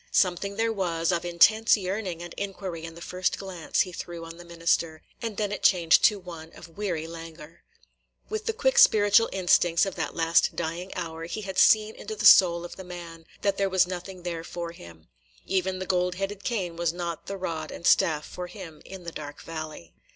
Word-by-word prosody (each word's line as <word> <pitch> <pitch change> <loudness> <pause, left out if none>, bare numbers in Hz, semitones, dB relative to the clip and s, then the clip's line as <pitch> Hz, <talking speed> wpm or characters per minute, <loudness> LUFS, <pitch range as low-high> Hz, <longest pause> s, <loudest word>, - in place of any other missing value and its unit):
Something 190 +2 +1
there 225 +1 0
was 170 -4 0
of 170 -1 0
intense 215 +7 +5
yearning 185 -3 -4
and 175 - -8
inquiry 190 -4 -5
in 165 0 -9
the 170 - -10
first 185 0 -1
glance 185 -4 -2
he 185 - -2
threw 170 -1 -7
on 165 0 -10
the 175 - -11
minister, 165 -1 -1 0.2
and 225 -3 -4
then 210 -2 -1
it 205 - -4
changed 170 -4 +4
to 210 - +4
one 165 -4 -10
of 165 -1 -14
weary 180 -6 -2
languor. 165 -1 -10 0.7
With 435 0 -4
the - - +2
quick - - +2
spiritual 205 +1 +6
instincts 175 -2 +3
of 195 - -4
that - - -3
last 165 0 +2
dying 170 +4 -4
hour, 165 -1 -5
he 215 +6 -5
had 190 -2 -3
seen 215 0 +5
into 435 - -7
the - - -3
soul 170 -2 +7
of 175 - -10
the 190 - -8
man, 170 -2 -10
– - - -25
that 200 -1 +1
there 195 -1 +1
was 190 -1 +4
nothing 180 0 -7
there 170 -2 -4
for 170 0 -6
him. 85 - -14 0.4
Even 190 0 0
the 185 - -4
gold 180 -1 0
headed 195 +1 -4
cane 190 -8 -2
was 170 -1 +1
not 170 -1 -5
the 195 - -4
rod 165 -4 -4
and 170 - -8
staff 160 -6 +3
for 180 0 -7
him 175 -4 -10
in 190 -2 -10
the 170 - -6
dark 145 -2 -8
valley. 155 - -7
175 Hz, 210 wpm, -26 LUFS, 165-195 Hz, 0.7 s, soul